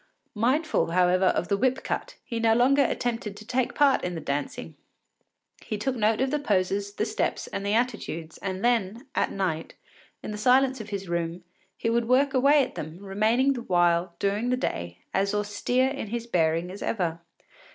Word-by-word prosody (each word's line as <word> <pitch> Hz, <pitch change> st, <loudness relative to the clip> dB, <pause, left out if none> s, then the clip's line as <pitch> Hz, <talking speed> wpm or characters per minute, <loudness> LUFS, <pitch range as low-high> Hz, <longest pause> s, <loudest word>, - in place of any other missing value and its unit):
Mindful, 255 Hz, -, +1 dB
however, 180 Hz, +2 st, +3 dB
of 175 Hz, -, +1 dB
the 200 Hz, -, +1 dB
whip 260 Hz, +4 st, +1 dB
cut, -, -, -3 dB
he 230 Hz, -2 st, -3 dB
no 225 Hz, -1 st, +4 dB
longer 265 Hz, +4 st, +4 dB
attempted 230 Hz, -5 st, -2 dB
to 215 Hz, -, -11 dB
take 250 Hz, +1 st, -1 dB
part 285 Hz, -2 st, +4 dB
in 180 Hz, -1 st, -2 dB
the -, -, -3 dB
dancing; 145 Hz, -1 st, -4 dB, 0.9 s
he 215 Hz, -, -3 dB
took 260 Hz, +5 st, -1 dB
note 220 Hz, 0 st, +2 dB
of 265 Hz, 0 st, +1 dB
the 300 Hz, -, +1 dB
poses, 200 Hz, -4 st, 0 dB
the 210 Hz, -, -1 dB
steps, 215 Hz, -1 st, -1 dB
and 195 Hz, -, -5 dB
the 200 Hz, +1 st, +1 dB
attitudes, 215 Hz, -10 st, -2 dB
and 190 Hz, +2 st, -3 dB
then, 230 Hz, 0 st, +1 dB
at -, -, 0 dB
night, 170 Hz, -5 st, -2 dB, 0.5 s
in -, -, -5 dB
the 210 Hz, -, -5 dB
silence 260 Hz, +2 st, +3 dB
of 210 Hz, -, -9 dB
his 195 Hz, -2 st, -4 dB
room, 170 Hz, 0 st, -2 dB, 0.3 s
he -, -, -2 dB
would 230 Hz, 0 st, +1 dB
work 270 Hz, +3 st, +3 dB
away 280 Hz, +2 st, +5 dB
at -, -, -6 dB
them, 155 Hz, +2 st, -7 dB
remaining 215 Hz, +8 st, +1 dB
the 245 Hz, -, -5 dB
while, 175 Hz, -3 st, +2 dB
during 205 Hz, +4 st, 0 dB
the 250 Hz, -, +1 dB
day, 85 Hz, -, -3 dB, 0.2 s
as 200 Hz, +1 st, +1 dB
austere 210 Hz, +5 st, +1 dB
in 275 Hz, -5 st, -5 dB
his 235 Hz, +2 st, -4 dB
bearing 170 Hz, -4 st, +1 dB
as 195 Hz, -, -9 dB
ever. 170 Hz, -6 st, -1 dB
210 Hz, 190 wpm, -26 LUFS, 185-250 Hz, 0.9 s, away